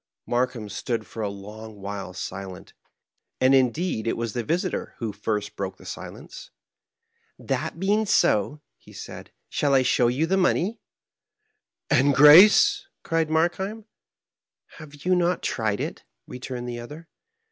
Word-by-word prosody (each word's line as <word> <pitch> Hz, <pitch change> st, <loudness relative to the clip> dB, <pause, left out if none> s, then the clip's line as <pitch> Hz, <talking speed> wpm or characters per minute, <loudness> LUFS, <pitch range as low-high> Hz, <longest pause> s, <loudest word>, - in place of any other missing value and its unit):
Markheim 120 Hz, -2 st, -1 dB
stood 110 Hz, +2 st, -3 dB
for 115 Hz, -, -8 dB
a 105 Hz, -, -1 dB
long 105 Hz, +2 st, -10 dB
while 100 Hz, -1 st, -6 dB
silent, 95 Hz, 0 st, -8 dB, 0.7 s
and 130 Hz, +1 st, +4 dB
indeed 130 Hz, -1 st, +1 dB
it -, -, 0 dB
was 115 Hz, -2 st, -3 dB
the 120 Hz, -, -2 dB
visitor 170 Hz, +9 st, -2 dB
who 115 Hz, -4 st, -4 dB
first 105 Hz, 0 st, -3 dB
broke 95 Hz, -1 st, -5 dB
the -, -, -16 dB
silence. -, -, -9 dB, 0.9 s
"That -, -, -3 dB
being 205 Hz, +3 st, +1 dB
so," 145 Hz, -, +2 dB, 0.2 s
he -, -, -17 dB
said, -, -, -10 dB
" -, -, -52 dB
shall 140 Hz, -2 st, +1 dB
I 130 Hz, -, +4 dB
show 125 Hz, -1 st, +3 dB
yon 140 Hz, +7 st, 0 dB
the 190 Hz, -, +2 dB
money? 190 Hz, +4 st, +1 dB, 0.5 s
" -, -, -54 dB
"And 140 Hz, +1 st, +4 dB
grace?" 210 Hz, -, +7 dB, 0.2 s
cried 165 Hz, -1 st, 0 dB
Markheim. 190 Hz, +7 st, -1 dB, 0.9 s
"Have 150 Hz, -1 st, -13 dB
you 185 Hz, -, +3 dB
not 180 Hz, 0 st, 0 dB
tried 110 Hz, -3 st, -1 dB
it?" -, -, -5 dB, 0.2 s
returned 125 Hz, -1 st, -7 dB
the 120 Hz, -1 st, -5 dB
other. 150 Hz, +8 st, -10 dB
130 Hz, 145 wpm, -25 LUFS, 110-165 Hz, 0.9 s, grace